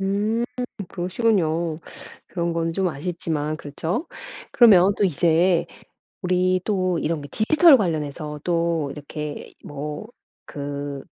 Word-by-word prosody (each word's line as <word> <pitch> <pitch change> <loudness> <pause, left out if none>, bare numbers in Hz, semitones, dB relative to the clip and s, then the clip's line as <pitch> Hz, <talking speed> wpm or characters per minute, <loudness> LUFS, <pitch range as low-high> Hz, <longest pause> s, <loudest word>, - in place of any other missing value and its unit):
음 205 +4 0 0.4
그러시군요. 175 -4 0 0.5
그런 170 -2 -2
거는 165 0 -1
좀 190 0 +1
아쉽지만 155 -1 -3
그렇죠. 160 - -4 0.4
그러면 200 -5 +6
또 - - +1
이제 170 +1 +3 0.6
우리 185 0 +2
또 185 -4 0
이런 160 0 -1
게 145 - -9
디지털 305 - +6
관련해서 150 - -3
또 170 -4 0
이렇게 150 0 -7
뭐 150 +5 -6 0.4
그 145 -1 -5
170 Hz, 230 characters per minute, -23 LUFS, 150-185 Hz, 0.6 s, 그러면